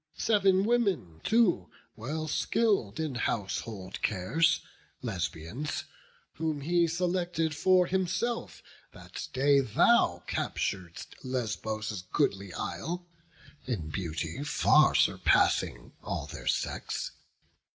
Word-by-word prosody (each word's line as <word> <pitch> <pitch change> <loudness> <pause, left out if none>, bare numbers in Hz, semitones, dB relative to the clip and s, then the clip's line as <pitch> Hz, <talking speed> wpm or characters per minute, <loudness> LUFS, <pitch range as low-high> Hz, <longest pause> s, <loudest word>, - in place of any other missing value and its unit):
Sev'n 195 -3 +3
women 195 - 0
too, 195 - +3 0.3
well 155 +7 -4
skill'd 195 - +1
in 155 -3 -1
household 100 -4 -3
cares, 135 - +2 0.4
Lesbians, 115 - -3 0.5
whom 155 -2 -1
he 170 +3 +2
selected 175 -1 0
for 185 +3 +4
himself, 190 +6 -2 0.3
That - - -8
day 140 +2 +4
thou 130 - +3
captur'dst 90 -4 -3
Lesbos' 110 -5 -3
goodly 95 -1 0
isle, 175 - -4 0.6
In 95 -12 -3
beauty 80 - -3
far 150 - +4
surpassing - - +2
all - - -3
their - - -9
sex. - - -1
145 Hz, 95 wpm, -30 LUFS, -, 0.6 s, for